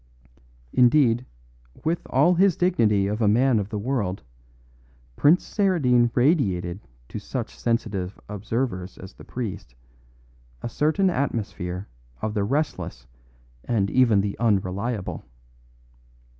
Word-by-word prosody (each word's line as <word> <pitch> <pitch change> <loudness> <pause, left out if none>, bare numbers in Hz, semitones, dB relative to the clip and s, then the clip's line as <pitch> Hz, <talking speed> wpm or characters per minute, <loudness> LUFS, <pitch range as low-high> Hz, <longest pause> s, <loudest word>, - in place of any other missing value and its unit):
Indeed, 125 -1 +4 0.6
with 165 +2 0
all 180 - +4
his 185 0 +3
dignity 115 - +2
of 105 +3 -2
a 110 - +3
man 120 +2 +4
of 100 0 -4
the 105 - -3
world, 105 - -2 0.9
Prince 160 +5 +4
Saradine 140 - +2
radiated 100 - +1 0.3
to - - -5
such - - -5
sensitive 105 -5 -2
observers 105 -2 -3
as 95 - -10
the - - -14
priest, 95 - -6 0.9
a - - -3
certain 160 - +2
atmosphere 100 - -3 0.3
of 110 - -3
the 105 -2 0
restless 110 - -2 0.6
and 100 -5 0
even 115 -6 +4
the 100 0 -2
unreliable. 100 -1 -1
115 Hz, 115 wpm, -24 LUFS, 100-135 Hz, 0.9 s, Indeed